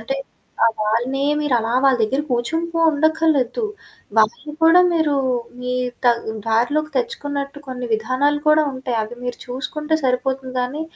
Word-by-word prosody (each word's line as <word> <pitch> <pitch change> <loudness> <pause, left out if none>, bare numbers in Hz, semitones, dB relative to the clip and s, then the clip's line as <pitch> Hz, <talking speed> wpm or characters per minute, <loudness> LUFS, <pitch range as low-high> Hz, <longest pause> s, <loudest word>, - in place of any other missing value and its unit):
అంటే 270 +5 -3 0.5
ఆ! - - +7 0.2
వాళ్ళనే 240 +6 0 0.2
మీరు 295 -4 +1
అలా 225 +1 -2
వాళ్ళ 270 -2 +5
దగ్గర 265 +7 +1
కూర్చుంటూ 325 +8 -1 0.2
ఉండఖర్లేదు. 315 - +1 0.5
వాళ్ళని 225 +7 +2
కూడా 330 +2 +7
మీరు 315 -3 +2 0.5
మీ 250 0 -3 0.3
త - - +3 0.4
దారిలోకి 270 +8 +1
తెచ్చుకున్నట్టు 290 - -3
కొన్ని 250 -1 -5
విధానాలు 255 +7 +1
కూడా 305 0 +5
ఉంటాయి. 260 -2 -3
అవి 225 +3 -7
మీరు 245 -1 -4
చూసుకుంటే 300 +5 -2
సరిపోతుంది 260 0 -1
గానీ, 260 +5 -3
270 Hz, 135 wpm, -20 LUFS, 245-305 Hz, 0.5 s, ఆ